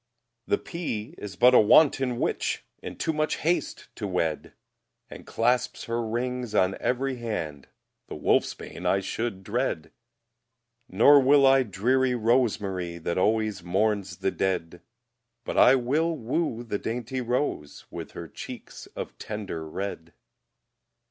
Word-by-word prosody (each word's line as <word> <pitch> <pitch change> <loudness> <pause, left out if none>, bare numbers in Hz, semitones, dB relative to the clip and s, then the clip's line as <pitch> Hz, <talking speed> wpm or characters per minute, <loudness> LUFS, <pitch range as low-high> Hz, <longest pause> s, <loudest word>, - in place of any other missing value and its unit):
The - - +2
pea 155 - -5
is 100 -3 -7
but 125 +6 +6
a - - +8
wanton 130 +2 +4
witch, - - -1 0.2
In - - -7
too 160 - -1
much 155 0 0
haste 170 +3 -1
to 105 - -3
wed, 85 -4 -2 0.6
And - - -11
clasps 120 +2 0
her 115 0 -2
rings 120 0 -3
on 95 -1 +3
every 130 +1 -1
hand; 80 - -4 0.4
The - - -7
wolfsbane - - -1
I 95 - +3
should 100 0 -4
dread; 105 -6 -2 1.0
Nor 130 +9 +7
will 140 +1 +5
I 135 0 +6
dreary 125 +4 +1
rosemarye, 105 -7 0
That 85 +2 -1
always 110 0 +1
mourns 95 0 0
the 95 0 -1
dead; 90 -2 -2 0.6
But - - -4
I 130 - +7
will 155 +6 0
woo 120 -1 -2
the 105 -4 -3
dainty 125 +3 -3
rose, 120 - -2
With - - -7
her - - -7
cheeks - - -9
of - - -6
tender 95 -7 -5
red. 85 -2 -5
115 Hz, 135 wpm, -26 LUFS, 95-130 Hz, 1.0 s, a